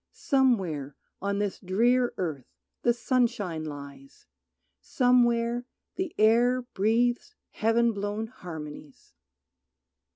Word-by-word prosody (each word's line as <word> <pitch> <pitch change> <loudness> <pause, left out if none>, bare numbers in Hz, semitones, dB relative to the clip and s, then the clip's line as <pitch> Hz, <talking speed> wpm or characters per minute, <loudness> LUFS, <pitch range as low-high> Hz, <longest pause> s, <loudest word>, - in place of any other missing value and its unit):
Somewhere 190 - +1 0.3
on 200 0 -1
this 205 -1 -2
drear 240 +7 +2
earth 155 -8 -3 0.3
the 240 - +3
sunshine 230 - 0
lies, 140 -2 -10 0.5
Somewhere 240 -1 +2 0.3
the 370 -3 -4
air 240 +4 +4
breathes 240 - 0 0.2
Heaven 230 +2 +2
blown 205 +2 -3
harmonies. 155 - -10
220 Hz, 90 wpm, -27 LUFS, 175-245 Hz, 0.5 s, air